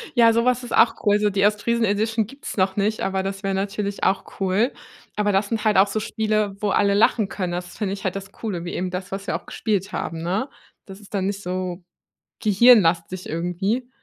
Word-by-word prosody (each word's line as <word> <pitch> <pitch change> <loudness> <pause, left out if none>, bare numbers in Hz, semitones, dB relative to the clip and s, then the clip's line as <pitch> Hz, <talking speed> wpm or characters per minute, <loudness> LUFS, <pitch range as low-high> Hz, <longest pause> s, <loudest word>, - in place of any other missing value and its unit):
Ja, 230 -1 +6
so 230 +1 +2
was 250 0 +2
ist 240 - -6
auch 230 - +5
cool. 205 0 +4
So, 210 0 +2
die 200 0 +2
Ostfriesen-Edition 220 0 +1
gibt's 275 -3 -8
noch 190 0 +2
nicht, 210 +2 0
aber 190 0 -1
das 195 +1 -5
wäre 195 0 0
natürlich 200 +1 -3
auch 195 - -1
cool. 195 +6 +1 0.4
Aber 210 -1 +1
das 195 +1 +1
sind 225 -1 -2
halt 210 -3 +3
auch 195 +1 +6
so 215 +2 -2
Spiele, 215 -2 -1
wo 210 - +1
alle 200 0 +3
lachen 215 0 +3
können. 185 -3 -3
Das 180 0 -6
finde 195 -3 -2
ich 195 - -7
halt 190 -1 -1
das 195 0 -7
Coole, 190 -7 -5
wie 175 - -5
eben 180 0 -2
das, 180 +1 -5
was 195 +1 -5
wir - - -1
auch - - -6
gespielt 200 -4 -2
haben, 165 -1 -4
ne? 195 +11 -1 0.4
Das 195 0 -11
ist 205 - -17
dann 195 -1 0
nicht 200 0 -3
so 180 0 -4 0.6
gehirnlastig, 185 -5 +4
irgendwie. 190 +9 -2
200 Hz, 220 wpm, -23 LUFS, 190-215 Hz, 0.6 s, Ja